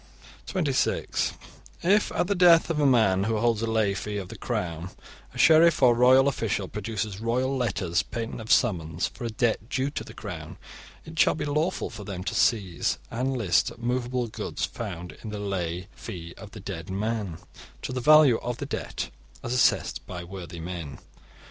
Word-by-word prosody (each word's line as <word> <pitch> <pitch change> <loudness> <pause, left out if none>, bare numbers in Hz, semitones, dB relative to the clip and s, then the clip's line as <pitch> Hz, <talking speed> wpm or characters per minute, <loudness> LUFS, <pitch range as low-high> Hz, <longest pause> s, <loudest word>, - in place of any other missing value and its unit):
(26) 150 -9 0 0.5
If 200 +4 +3
at - - +1
the 200 - +1
death 175 -3 +6
of 155 - -1
a 145 - +4
man 100 -7 +4
who 110 0 0
holds 115 0 +1
a 115 - -1
lay 110 -3 +2
'fee' 105 +1 -4
of 95 -3 -5
the - - -8
Crown, 85 0 -3 0.4
a - - -12
sheriff 160 -2 +6
or 125 -2 +7
royal 130 +3 +6
official 110 -7 -1
produces 105 -1 -4
royal 125 +4 0
letters 95 -9 0
patent 115 0 -5
of 110 - -5
summons 85 -7 +2
for 120 - -6
a - - -1
debt 115 -1 0
due 135 +1 -1
to - - -4
the - - -12
Crown, 85 -8 -7 0.5
it 160 0 -8
shall - - +5
be 150 - -3
lawful 155 +5 -1
for 105 -1 -8
them 95 -2 -5
to - - -3
seize 95 -8 +1
and 130 +3 -1
list 105 -2 +1
movable 125 +1 -1
goods 110 - -3
found 90 +2 -6
in 110 - -7
the 105 - -5
lay 90 -3 -3
'fee' 85 -6 -8
of 110 - -11
the 105 - -10
dead 95 -3 -6
man 100 -3 -2 0.5
to - - -3
the 130 - -2
value 150 -3 +7
of 120 -1 -4
the - - -4
debt, - - -4 0.3
as 120 - -2
assessed 125 - +2
by 90 -1 -6
worthy 85 -2 -8
men. 85 -4 -6
110 Hz, 185 wpm, -26 LUFS, 95-130 Hz, 0.5 s, or